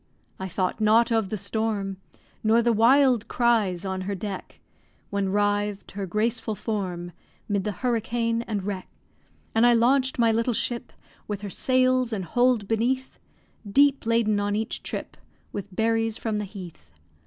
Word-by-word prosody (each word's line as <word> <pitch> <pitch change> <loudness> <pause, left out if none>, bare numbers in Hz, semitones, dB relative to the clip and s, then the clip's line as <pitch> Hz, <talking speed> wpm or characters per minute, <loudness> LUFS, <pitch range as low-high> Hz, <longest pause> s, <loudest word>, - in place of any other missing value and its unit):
I 190 - -3
thought 185 +3 -2
not 220 +2 +4
of 225 -4 +1
the 215 - -2
storm, 200 -1 -2 0.5
Nor 225 +2 +4
the 235 0 +3
wild 245 +1 +4
cries 215 -7 +1
on 190 -1 -2
her 200 +2 -3
deck, 195 0 -6 0.5
When 200 -1 0
writhed 205 0 0
her 200 -1 -4
graceful 220 +3 -1
form 185 -6 -3 0.4
'Mid 200 -2 -1
the 210 - 0
hurricane 230 +1 -1
and 205 -3 -2
wreck. 190 -2 -4 0.7
And 225 - +3
I 240 0 +6
launch'd 260 +3 +3
my 230 -2 +4
little 230 +1 +1
ship, 240 +2 -2 0.4
With 205 -1 -4
her 205 -2 -6
sails 255 0 +2
and 195 -4 -2
hold 245 +1 +2
beneath; 245 +4 -1 0.5
Deep 280 +1 +4
laden 225 -2 +2
on 205 0 0
each 220 +1 -3
trip, - - -6 0.4
With 200 -1 -6
berries 225 0 +1
from 220 -2 -2
the 210 - -3
heath. 180 - -10
220 Hz, 155 wpm, -25 LUFS, 200-235 Hz, 0.7 s, I